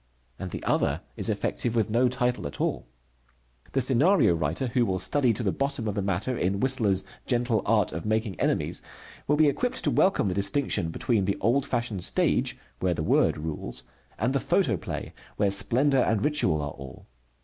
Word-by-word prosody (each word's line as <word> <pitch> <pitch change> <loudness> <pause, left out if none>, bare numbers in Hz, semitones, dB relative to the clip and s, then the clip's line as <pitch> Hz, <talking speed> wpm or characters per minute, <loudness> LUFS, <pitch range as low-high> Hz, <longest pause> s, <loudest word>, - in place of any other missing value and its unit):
And 95 - -5
the - - -6
other - - 0
is - - 0
effective 120 -1 -1
with 110 -2 +1
no 120 +3 +3
title 125 -7 -1
at 70 - -9
all. - - -2 0.9
The 135 - +2
scenario 135 - +4
writer 80 - -1
who 120 +1 +2
will 95 -5 0
study 130 +5 +2
to 115 - -4
the 100 - +1
bottom 135 -3 -2
of 105 - -1
the 100 - -2
matter 100 +6 -1
in 95 -2 -1
Whistler's 110 -7 +1 0.2
Gentle 120 -4 +1
Art 105 -3 +2
of 80 +2 -5
Making 110 -1 -1
Enemies - - 0 0.5
will 150 - +3
be 155 0 +4
equipped 245 - -1
to - - +2
welcome 190 - +3
the 95 - 0
distinction 100 - +1
between 105 +4 0
the 100 - -1
old 125 +6 +1
fashioned 115 -7 -2
stage, - - +1 0.2
where 90 -2 0
the 80 - -3
word - - +2
rules, 75 -5 -4 0.3
and - - 0
the - - +2
photoplay, - - -1 0.2
where 100 -2 +2
splendor 130 +8 +2
and 110 -3 +1
ritual 90 - +1
are 70 - -4
all. 70 -2 -11
110 Hz, 185 wpm, -26 LUFS, 95-130 Hz, 0.9 s, scenario